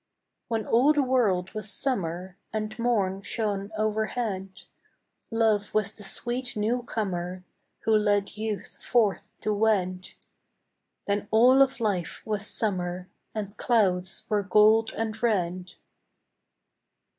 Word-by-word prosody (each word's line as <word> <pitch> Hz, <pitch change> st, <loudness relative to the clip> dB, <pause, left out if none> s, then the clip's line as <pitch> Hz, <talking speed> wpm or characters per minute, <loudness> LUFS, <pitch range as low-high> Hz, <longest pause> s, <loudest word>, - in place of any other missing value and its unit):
II -, -, -56 dB
When 225 Hz, -3 st, -1 dB
all 260 Hz, +6 st, +4 dB
the 295 Hz, -2 st, +2 dB
world 210 Hz, -9 st, +1 dB
was 215 Hz, -1 st, -5 dB
Summer, 185 Hz, -8 st, -2 dB, 0.2 s
And 215 Hz, +1 st, -4 dB
morn 200 Hz, -5 st, +1 dB
shone 205 Hz, -1 st, -2 dB
overhead, 215 Hz, -3 st, -2 dB, 0.7 s
Love 220 Hz, -3 st, +1 dB
was 215 Hz, -1 st, +2 dB
the 210 Hz, -, -13 dB
sweet 245 Hz, +5 st, -2 dB
new 225 Hz, +4 st, 0 dB
comer 185 Hz, -6 st, -3 dB, 0.4 s
Who 220 Hz, -, +3 dB
led 205 Hz, -1 st, +1 dB
youth 215 Hz, -1 st, -5 dB
forth 220 Hz, -5 st, +1 dB
to 215 Hz, -, 0 dB
wed; 190 Hz, -4 st, 0 dB, 0.9 s
Then 205 Hz, 0 st, -1 dB
all 250 Hz, +5 st, +6 dB
of 270 Hz, -1 st, +3 dB
life 200 Hz, -7 st, -2 dB
was 210 Hz, -2 st, 0 dB
Summer, 180 Hz, -3 st, -2 dB, 0.3 s
And 205 Hz, -1 st, -4 dB
clouds 190 Hz, -6 st, +1 dB
were 210 Hz, -1 st, +1 dB
gold 215 Hz, +2 st, +4 dB
and 220 Hz, -1 st, -3 dB
red. 185 Hz, -5 st, 0 dB
210 Hz, 120 wpm, -27 LUFS, 190-225 Hz, 0.9 s, all